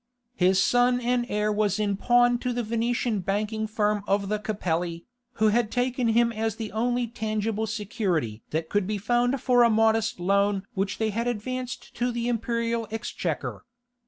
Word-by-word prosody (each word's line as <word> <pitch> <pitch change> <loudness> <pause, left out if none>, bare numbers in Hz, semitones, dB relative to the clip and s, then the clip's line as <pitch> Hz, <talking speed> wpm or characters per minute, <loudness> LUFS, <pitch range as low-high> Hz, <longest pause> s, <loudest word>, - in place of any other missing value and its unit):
His 185 -2 +3
son 245 +5 +3
and 245 0 0
heir 210 +1 0
was 210 -1 +1
in 205 -2 0
pawn 245 +3 +3
to 250 0 -2
the 240 0 -1
Venetian 230 0 0
banking 210 +3 -1
firm 210 -1 0
of 200 0 +1
the 210 0 0
Capelli, 175 -5 -2 0.3
who 220 -2 +3
had 225 0 +2
taken 250 0 0
him 235 +1 +3
as 220 -1 -2
the 225 -2 -5
only 240 +3 0
tangible 220 -1 -2
security 195 - -2
that 160 +1 -2
could 205 +1 0
be 210 0 -1
found 240 +5 +1
for 245 -1 +3
a 235 - +6
modest 225 -1 +2
loan 200 +2 +2
which 195 -1 -2
they 220 -1 0
had 230 +3 -2
advanced 250 +2 -4
to 245 +1 0
the 235 0 -2
imperial 230 -1 -1
exchequer. 225 +1 -4
220 Hz, 170 wpm, -26 LUFS, 205-240 Hz, 0.3 s, a